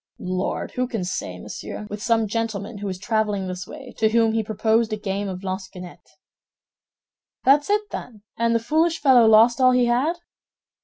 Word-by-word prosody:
"Lord, 185 +1 -3
who 250 0 -1
can 225 -6 -3
say, 180 - -4
monsieur? 210 - -7
With 210 0 -7
some 225 -1 +2
gentleman 215 -1 -3
who 205 - -4
was 185 -1 -4
traveling 210 -1 -1
this 185 0 -6
way, 275 -4 -10
to 220 - +3
whom 225 0 +2
he 225 - +1
proposed 220 +1 +1
a 215 - -1
game 200 -1 -3
of 185 0 -6
lansquenet." 185 -1 -7 1.4
"That's 290 +4 +4
it, 415 +1 +2
then, 215 -4 -8
and 230 0 +1
the - - +3
foolish 320 +7 +1
fellow 255 -5 +6
lost 225 +4 +5
all 255 0 +6
he 250 -1 +3
had?" 255 +8 +1
220 Hz, 175 wpm, -23 LUFS, 200-245 Hz, 1.4 s, fellow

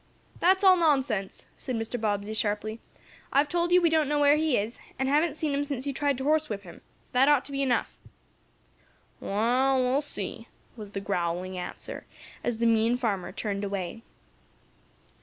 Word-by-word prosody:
"That's 375 +3 +3
all 375 -1 +7
nonsense!" 265 - +1
said 255 - -3
Mr. 225 +1 -3
Bobbsey, 205 -1 -1
sharply. 215 +1 -2 0.5
"I've 280 +2 +3
told 345 +3 0
you 360 - +7
we 335 - +5
don't 310 -3 +2
know 295 - +1
where 290 0 +6
he 310 -3 +2
is, 215 +4 -3 0.2
and 265 - 0
haven't 300 +2 +2
seen 310 -2 -1
him 280 +1 +1
since 280 -2 -4
you 280 - -2
tried 285 -1 0
to 265 - -4
horsewhip 295 -9 0
him. 175 - -12 0.3
That 265 +3 +4
ought 290 -3 +4
to - - -8
be 275 0 -2
enough." 260 -3 0 1.2
"Wa'al, 250 +6 +2
we'll 255 +3 +2
see," 290 - -6 0.3
was 210 -3 -10
the 195 - -3
growling 180 -1 -2
answer, 180 - -7 0.4
as 240 -2 -1
the 235 - 0
mean 230 +1 +3
farmer 205 -7 -2
turned 200 -2 -3
away. 195 +1 -4
250 Hz, 175 wpm, -27 LUFS, 210-290 Hz, 1.2 s, all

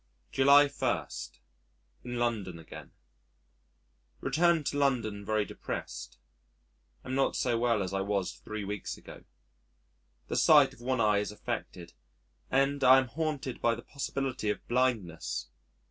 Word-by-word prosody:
July 140 +2 +6
1. - - -1 1.0
In 120 0 -4
London 110 -7 -1
Again 80 - -11 1.3
Returned 170 -2 +2
to 145 - -1
London 115 -7 0
very 110 0 0
depressed. - - -6 0.9
Am 130 - -4
not 135 0 +1
so 120 -2 +1
well 115 -4 +2
as 95 - -5
I 95 - 0
was 100 -2 -1
three 110 -1 -6
weeks 105 0 -4
ago. - - -13 1.0
The - - -2
sight - - +6
of - - -17
one 130 +1 -1
eye 105 -2 +4
is 105 - -3
affected, 90 -4 -6 0.6
and 135 +1 +2
I 130 +1 +8
am 130 -2 +1
haunted 150 -2 -3
by 115 0 +3
the 120 - -10
possibility 135 -5 -3
of 105 - -3
blindness. 90 - -1
120 Hz, 135 wpm, -30 LUFS, 105-135 Hz, 1.3 s, I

